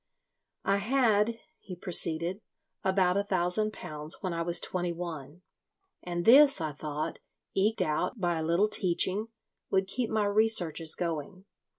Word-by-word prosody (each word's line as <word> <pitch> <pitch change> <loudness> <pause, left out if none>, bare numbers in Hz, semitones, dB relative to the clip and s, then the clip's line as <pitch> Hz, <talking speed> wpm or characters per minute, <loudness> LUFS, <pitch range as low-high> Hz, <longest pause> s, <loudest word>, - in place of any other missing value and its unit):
"I 200 - +2
had," 225 -1 +2 0.2
he 185 - -9
proceeded, 175 +1 -1 0.4
"about 190 -1 +2
a 200 - +1
thousand 190 +2 0
pounds 155 -4 -1
when 185 -3 -3
I 165 - -2
was 170 +1 +3
twenty 180 -1 -1
one, 170 -1 -7 0.6
and 175 -1 -4
this, 275 +1 +7
I 155 -2 -2
thought, 150 +1 -5 0.3
eked 210 +3 +1
out 155 +9 -2
by 175 -3 0
a - - -2
little 170 +6 +2
teaching, 195 +1 +1 0.4
would 190 0 +2
keep 225 +4 -3
my 215 -1 +1
researches 200 -7 +1
going. 175 +3 -4
185 Hz, 145 wpm, -29 LUFS, 170-210 Hz, 0.6 s, this